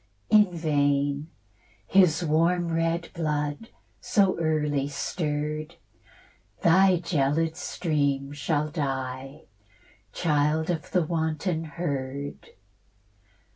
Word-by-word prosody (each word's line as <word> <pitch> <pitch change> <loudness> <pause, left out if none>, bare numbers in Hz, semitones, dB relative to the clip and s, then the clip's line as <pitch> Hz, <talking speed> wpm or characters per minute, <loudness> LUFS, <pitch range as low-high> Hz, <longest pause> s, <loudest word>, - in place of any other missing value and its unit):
In 210 -3 +6
vain: 145 -2 0 0.6
his 180 -3 +4
warm 170 +3 +2
red 165 +1 0
blood, 150 +4 -2 0.3
so 195 -3 +2
early 150 -3 0
stirr'd, 150 +1 -3 0.9
Thy 185 +2 +5
gelid 160 -1 0
stream 145 -6 -1
shall 145 +1 -1
dye, 135 -1 -4 0.7
Child 155 +1 +1
of 160 -3 -4
the 180 -3 +2
wanton 160 +1 -1
herd. 140 -3 -4
155 Hz, 85 wpm, -26 LUFS, 145-170 Hz, 0.9 s, In